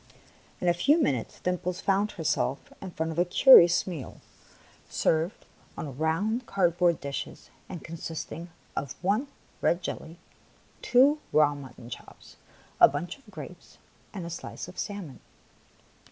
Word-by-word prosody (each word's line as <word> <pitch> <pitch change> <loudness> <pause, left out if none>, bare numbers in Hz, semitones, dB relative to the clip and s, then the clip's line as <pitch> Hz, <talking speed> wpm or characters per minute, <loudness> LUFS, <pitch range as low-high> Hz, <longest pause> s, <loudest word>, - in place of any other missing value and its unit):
In 180 - -2
a 175 - +5
few 285 - +3
minutes, 130 - -1
Dimples 180 0 -2
found 200 +2 +1
herself 155 -5 -1
in 190 - -6
front 160 -1 -3
of 160 - -3
a - - +6
curious 175 -3 +7
meal, 165 -8 -7 0.7
served 160 +4 0 0.3
on 145 -6 -5
round 195 - 0
cardboard 175 -3 +2
dishes 140 -1 -6 0.2
and 175 - -7
consisting 165 +1 -6 0.3
of 135 -4 -3
one 210 +9 +1 0.3
red 175 +1 +1
jelly, 165 +1 -6 0.6
two 270 +5 +5
raw 150 -1 +4
mut 135 -3 -10
ton 120 -1 -12
chops, - - -11 0.4
a - - +10
bunch 155 - -5
of 275 - -20
grapes, - - -11 0.3
and 190 -5 -6
a 170 - -6
slice 170 - -7
of 180 - -10
salmon. 200 -9 -5
175 Hz, 140 wpm, -28 LUFS, 155-195 Hz, 0.7 s, a